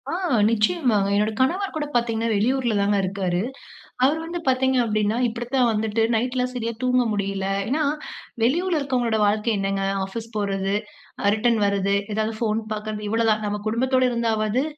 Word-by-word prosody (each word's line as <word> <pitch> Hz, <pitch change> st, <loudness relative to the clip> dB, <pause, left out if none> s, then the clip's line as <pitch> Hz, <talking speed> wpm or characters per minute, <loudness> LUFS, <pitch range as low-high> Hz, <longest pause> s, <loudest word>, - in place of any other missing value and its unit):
ஆ -, -, -2 dB, 0.4 s
நிச்சயமாங்க. 225 Hz, -, +2 dB
என்னோட 210 Hz, +2 st, +2 dB
கணவர் 365 Hz, +10 st, +1 dB
கூட 305 Hz, -1 st, -1 dB
பாத்தீங்கன்னா, 230 Hz, -1 st, +1 dB
வெளியூர்லதாங்க 210 Hz, -3 st, +1 dB
இருக்காரு. 185 Hz, -2 st, -1 dB, 0.6 s
அவரு 295 Hz, +5 st, +3 dB
வந்து 345 Hz, +1 st, -4 dB
பாத்தீங்க 260 Hz, 0 st, +2 dB
அப்டின்னா, 215 Hz, 0 st, 0 dB
இப்டி 235 Hz, +1 st, -4 dB
தான் 250 Hz, -2 st, +4 dB
வந்துட்டு, 220 Hz, +1 st, 0 dB
நைட்லாம் 250 Hz, +2 st, 0 dB
சரியா 230 Hz, -2 st, -3 dB
தூங்க 255 Hz, 0 st, +3 dB
முடியல. 195 Hz, -1 st, -2 dB, 0.2 s
ஏன்னா 300 Hz, +6 st, +1 dB, 0.6 s
வெளியூர்ல 335 Hz, +7 st, +2 dB
இருக்கவங்களுடைய 245 Hz, -6 st, 0 dB
வாழ்க்கை 210 Hz, +2 st, +1 dB
என்னாங்க, 195 Hz, 0 st, -1 dB, 0.2 s
ஆஃபீஸ் 225 Hz, +4 st, -7 dB
போறது, 195 Hz, -1 st, -1 dB, 0.5 s
அ -, -, +4 dB
ரிட்டர்ன் 230 Hz, +1 st, +2 dB
வர்றது, 200 Hz, 0 st, +1 dB, 0.2 s
ஏதாவது 220 Hz, +1 st, -1 dB
போன் 220 Hz, -1 st, +1 dB
பாக்கறது 210 Hz, 0 st, -5 dB
இவ்வளவு 225 Hz, +1 st, +2 dB
தாங்க. 215 Hz, 0 st, 0 dB
நம்ம 205 Hz, 0 st, -3 dB
குடும்பத்தோட 255 Hz, +3 st, +2 dB
இருந்தாவாது 225 Hz, +1 st, 0 dB
225 Hz, 150 wpm, -23 LUFS, 210-250 Hz, 0.6 s, தான்